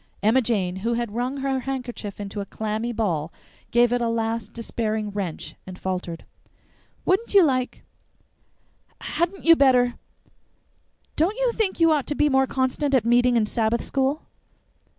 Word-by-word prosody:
Emma 225 +5 +4
Jane, 195 -6 -1
who 230 +5 -1
had 235 -3 -3
wrung 250 +4 -2
her 270 -1 0
handkerchief 245 -6 -5
into 205 0 -5
a - - -5
clammy 220 +3 -3
ball, 170 -9 -1 0.4
gave 240 0 +3
it 245 - +1
a 235 - +1
last 225 -1 -2
despairing 220 -2 -3
wrench, 195 -5 -4
and 185 -1 -8
faltered: 180 -3 -4 0.8
"Wouldn't 405 +3 +1
you 390 - +9
like 255 -4 0 1.2
hadn't 350 +3 -2
you 330 0 +8
better 250 -4 +3 1.2
don't 360 +9 +1
you - - +2
think 430 -6 -1
you'd 330 -1 +5
ought 295 -4 +1
to 295 - -1
be 295 +1 +3
more 265 -1 +3
constant 265 +2 0
at 240 -4 +2
meeting 245 +1 +4
and 215 -2 +2
Sabbath 225 +1 0
school?" 275 +2 -1
240 Hz, 155 wpm, -24 LUFS, 215-270 Hz, 1.2 s, you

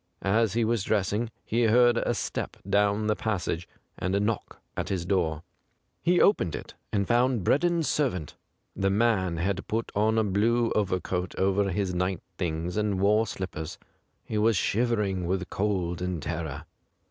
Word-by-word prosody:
As 105 +1 +2
he 115 0 +2
was 115 -3 +1
dressing, 105 +2 0 0.2
he 115 +1 +1
heard 120 +2 +5
a - - 0
step - - -3
down 105 +1 +2
the 105 0 +2
passage 90 -6 -2 0.3
and 95 +2 0
a - - +3
knock 105 +2 -2 0.2
at - - -3
his 90 -3 -2
door. 85 -5 0 0.6
He 175 +1 +3
opened 90 - +3
it, - - -8 0.2
and 100 -2 0
found 120 -2 +2
Breddon's 170 - +2
servant. 105 - -1 0.4
The 95 0 +1
man 100 -5 +2
had 95 +3 -1
put 115 +1 -2
on 110 +2 +2
a 110 - +4
blue 115 +4 +2
overcoat 95 -3 -1
over 100 +1 +2
his 95 0 -1
night 90 0 -1 0.2
things, 85 +1 -2
and 105 -3 0
wore 105 +3 +3
slippers. 80 -5 -5 0.5
He 105 - -2
was 110 -1 +3
shiver 115 +2 +1
ing 95 -3 -2
with 95 0 -2
cold 90 -4 -1
and 90 -2 -2
terror. 80 -1 -4
100 Hz, 165 wpm, -27 LUFS, 90-110 Hz, 0.6 s, heard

